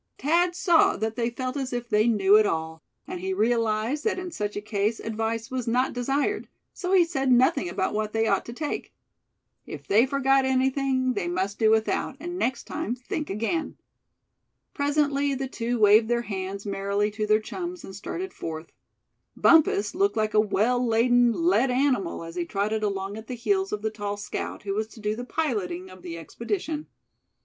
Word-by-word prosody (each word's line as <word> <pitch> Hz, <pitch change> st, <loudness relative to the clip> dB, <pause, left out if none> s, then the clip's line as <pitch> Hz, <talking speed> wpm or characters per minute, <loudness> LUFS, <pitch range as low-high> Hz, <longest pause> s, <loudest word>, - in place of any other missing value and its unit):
Thad 345 Hz, +4 st, +2 dB
saw 345 Hz, -3 st, +4 dB
that 220 Hz, 0 st, -2 dB
they 235 Hz, 0 st, 0 dB
felt 255 Hz, +2 st, -4 dB
as 270 Hz, -2 st, -3 dB
if 245 Hz, -1 st, -3 dB
they 215 Hz, -1 st, +3 dB
knew 205 Hz, -3 st, +4 dB
it 215 Hz, -, +4 dB
all; 160 Hz, 0 st, -3 dB, 0.2 s
and 180 Hz, -, -6 dB
he 190 Hz, +1 st, -2 dB
realized 230 Hz, +5 st, +1 dB
that 445 Hz, -, 0 dB
in 365 Hz, -1 st, -5 dB
such 210 Hz, -7 st, -3 dB
a -, -, -1 dB
case 210 Hz, +1 st, -1 dB
advice 225 Hz, +1 st, -3 dB
was 255 Hz, -2 st, -3 dB
not 250 Hz, +3 st, +1 dB
desired, 275 Hz, -, -1 dB, 0.3 s
so 365 Hz, -1 st, -4 dB
he 360 Hz, -3 st, +6 dB
said 270 Hz, -6 st, 0 dB
nothing 245 Hz, -7 st, +3 dB
about 190 Hz, +2 st, -1 dB
what 215 Hz, 0 st, -1 dB
they 225 Hz, 0 st, +1 dB
ought 195 Hz, -3 st, +2 dB
to -, -, -7 dB
take. 295 Hz, +4 st, -4 dB, 0.7 s
If -, -, -8 dB
they 225 Hz, +6 st, +4 dB
forgot 270 Hz, 0 st, +3 dB
anything, 265 Hz, 0 st, +1 dB
they 200 Hz, -6 st, -2 dB
must 190 Hz, +3 st, -2 dB
do 220 Hz, -1 st, +4 dB
without, 220 Hz, +4 st, +1 dB
and 350 Hz, +3 st, -5 dB
next 255 Hz, -4 st, -1 dB
time 235 Hz, -, -3 dB
think 255 Hz, +4 st, -5 dB
again. 230 Hz, -, -2 dB, 1.0 s
Presently 285 Hz, -1 st, +1 dB
the 265 Hz, 0 st, -3 dB
two 240 Hz, -1 st, -2 dB
waved 215 Hz, +1 st, +6 dB
their 240 Hz, 0 st, 0 dB
hands 195 Hz, -1 st, -5 dB
merrily 200 Hz, +1 st, -1 dB
to 215 Hz, 0 st, -3 dB
their 215 Hz, 0 st, +4 dB
chums, 350 Hz, -, -6 dB
and 190 Hz, -, -9 dB
started 365 Hz, -, -5 dB
forth. 160 Hz, 0 st, -6 dB, 0.7 s
Bumpus 285 Hz, -11 st, +4 dB
looked 390 Hz, -, +1 dB
like 215 Hz, 0 st, 0 dB
a 215 Hz, -, +5 dB
well 220 Hz, +4 st, +2 dB
laden, 240 Hz, +1 st, +4 dB
led 335 Hz, -1 st, +2 dB
animal 250 Hz, -10 st, 0 dB
as 165 Hz, 0 st, -8 dB
he 175 Hz, -1 st, -2 dB
trotted 210 Hz, +4 st, -1 dB
along 200 Hz, -1 st, -2 dB
at 220 Hz, 0 st, -10 dB
the 250 Hz, -, -4 dB
heels 385 Hz, -, 0 dB
of 210 Hz, -, -3 dB
the 220 Hz, -, 0 dB
tall 205 Hz, -1 st, -4 dB
scout, 210 Hz, +1 st, -5 dB
who 200 Hz, -1 st, -2 dB
was 215 Hz, +2 st, -1 dB
to 225 Hz, -, -15 dB
do 210 Hz, 0 st, -1 dB
the 245 Hz, -, -5 dB
piloting 195 Hz, -, -2 dB
of 185 Hz, 0 st, -13 dB
the 170 Hz, -2 st, -7 dB
expedition. 300 Hz, -, -4 dB
230 Hz, 190 wpm, -26 LUFS, 205-270 Hz, 1.0 s, he